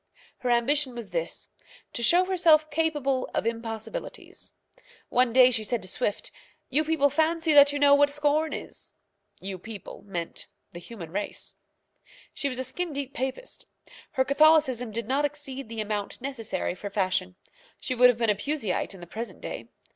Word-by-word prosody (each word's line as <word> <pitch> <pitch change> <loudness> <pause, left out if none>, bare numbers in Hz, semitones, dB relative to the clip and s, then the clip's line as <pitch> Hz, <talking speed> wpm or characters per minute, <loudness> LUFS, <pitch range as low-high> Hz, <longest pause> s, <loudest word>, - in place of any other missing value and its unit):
Her 250 - -2
ambition 255 +2 +2
was 235 -2 -7
this - - -3 0.5
to - - -3
show 350 +10 +5
herself 325 -5 +4
capable 295 -4 0
of - - 0
impossibilities. 230 - -5 0.6
One 250 -1 +3
day 255 +1 +7
she 225 -3 -1
said 230 0 -2
to - - -7
Swift, 205 +1 -2 0.4
"You 295 +4 +3
people 300 -3 +2
fancy 320 +2 +2
that 285 -1 +8
you 290 - -2
know 285 0 +6
what 285 0 +5
scorn 295 +2 +1
is." - - -7 0.5
"You 190 -1 -5
people" 210 -1 -9
meant 170 -4 -5 0.2
the 175 - -9
human 175 -4 -10
race. 205 +3 -5 0.8
She 280 - -2
was 255 - -5
a 260 - -1
skin 330 +6 -3
deep 280 -1 -4
Papist. 265 - -4 0.5
Her 260 - +2
Catholicism 280 -4 +4
did 230 0 -4
not 275 +3 +1
exceed 275 -4 -3
the 225 -1 -3
amount 210 -1 -3
necessary 235 -9 -3
for 200 +3 -7
fashion. 185 -2 -1 0.4
She 255 - -3
would 250 0 +7
have 245 - +2
been 230 -2 +2
a - - 0
Puseyite 215 -5 -2
in 185 - -13
the - - -8
present 225 +7 -7
day. - - -7
255 Hz, 170 wpm, -27 LUFS, 220-295 Hz, 0.8 s, that